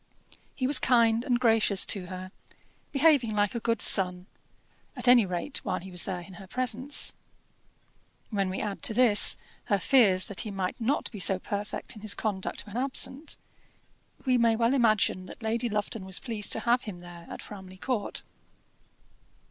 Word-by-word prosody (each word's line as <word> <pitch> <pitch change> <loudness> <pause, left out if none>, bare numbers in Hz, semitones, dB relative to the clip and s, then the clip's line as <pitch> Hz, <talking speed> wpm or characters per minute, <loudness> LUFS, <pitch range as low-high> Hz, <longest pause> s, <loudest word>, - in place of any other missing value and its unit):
He 255 - -2
was 275 +1 +5
kind 230 -2 +3
and 245 -3 0
gracious 225 -5 +3
to 190 -4 0
her, 185 0 -8 0.6
behaving 275 -7 +3
like 205 -1 +1
a 235 - -3
good 230 -1 0
son, 180 -1 +3 0.7
at - - -1
any 245 -4 +6
rate 180 +10 -4
while - - -2
he 190 +2 -11
was 180 -1 -2
there 185 -2 -4
in 190 +2 -13
her 190 - -12
presence. 255 +5 0 1.2
When 195 -3 0
we 185 - -4
add, 205 -2 -4
to 220 - 0
this, 235 -5 +6 0.3
her 200 - +1
fears 195 -3 +3
that 200 - -4
he 215 - -2
might 195 +1 -4
not 265 +6 -1
be 210 - -8
so 190 0 +5
perfect 205 +4 -5
in 210 - -12
his 215 -1 0
conduct 205 -3 -4
when 210 +1 -8
absent, 270 +3 0 0.9
we 255 -2 +3
may 230 -1 +3
well 230 +2 +1
imagine 215 -7 +1
that 230 - -11
Lady 230 +2 -1
Lufton 210 0 -3
was 190 -1 -1
pleased 220 -4 -2
to 225 - +1
have 240 +2 +1
him 185 -5 -8
there 175 -1 -12
at - - -8
Framley 190 -2 -11
Court. 225 0 -3
215 Hz, 175 wpm, -28 LUFS, 190-240 Hz, 1.2 s, any